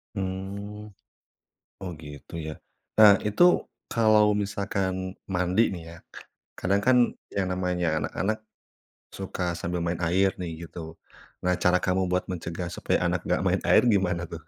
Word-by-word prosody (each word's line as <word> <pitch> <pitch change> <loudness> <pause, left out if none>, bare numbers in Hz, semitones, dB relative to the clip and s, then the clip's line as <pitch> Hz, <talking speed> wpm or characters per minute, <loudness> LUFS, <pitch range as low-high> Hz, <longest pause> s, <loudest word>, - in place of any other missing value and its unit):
Mmm. 100 +2 -5 0.9
Oh, 95 -2 -5
gitu, 75 0 -11
ya. 80 - -4 0.5
Nah, 105 -2 +9
itu, 105 +9 +1 0.5
kalau 110 -2 +5
misalkan 100 -2 -2 0.2
mandi, 90 +3 +2
nih 90 -3 -6
ya, - - -12 0.6
kadang, 100 +2 +1
kan, 130 0 +6 0.4
yang 100 -2 0
namanya 90 -1 -1 0.2
anak-anak 110 +3 -1 0.8
suka 95 -1 -5 0.2
sambil 90 0 -2
main 85 0 -2
air, 95 +3 +3
nih, 90 -2 -3 0.2
gitu. 85 - -12 0.7
Nah, 90 0 +3
cara 90 0 +4
kamu 95 +1 +1
buat 90 0 +1
mencegah 85 0 -4
supaya - - 0
anak - - 0
enggak - - +1
main - - +1
air - - +6
gimana, 95 -6 +2
tuh? 85 -1 -9
95 Hz, 140 wpm, -26 LUFS, 90-100 Hz, 0.9 s, Nah